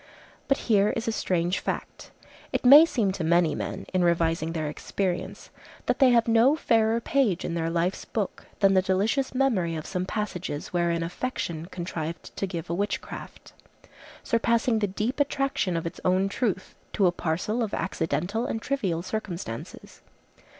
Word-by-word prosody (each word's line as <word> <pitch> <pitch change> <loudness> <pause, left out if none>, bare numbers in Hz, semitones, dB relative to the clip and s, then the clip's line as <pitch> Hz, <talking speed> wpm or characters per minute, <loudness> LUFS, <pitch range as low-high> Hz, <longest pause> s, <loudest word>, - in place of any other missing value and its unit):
But 275 - +3
here 210 -3 +4
is 230 0 -3
a - - +2
strange 180 -4 0
fact; - - -5 0.4
it - - -2
may 290 +5 +10
seem 220 -10 +1
to 185 -2 -4
many 170 0 +3
men, - - -4
in 185 -1 +2
revising 165 -1 +1
their 160 -2 -2
experience, 180 +4 -3 0.3
that - - 0
they 265 -3 +7
have 235 -1 +4
no 230 +5 +5
fairer 225 -6 +2
page 235 -7 +1
in - - -3
their 165 -1 -1
life's 170 +3 -1
book 210 -4 -4
than 195 -1 +5
the 190 - +5
delicious 205 +9 0
memory 210 -11 +1
of 155 - -5
some 180 0 -3
passages 180 -9 -4
wherein 170 -1 +1
affection 170 -3 -4
contrived 170 -3 -6
to 195 - -2
give 170 -4 -5
a 170 - -2
witchcraft, 205 +3 -5 0.7
surpassing 230 -1 +2
the 205 - +1
deep 215 +8 -2
attraction 275 -10 0
of 165 - -3
its 165 - -5
own 185 +2 +2
truth, 200 -3 -2 0.2
to 200 - +2
a 180 - +5
parcel 175 +7 -2
of 220 -3 -1
accidental 185 +6 -1
and 225 - -2
trivial 190 -12 -1
circumstances. 180 - -6
190 Hz, 165 wpm, -26 LUFS, 170-230 Hz, 0.7 s, may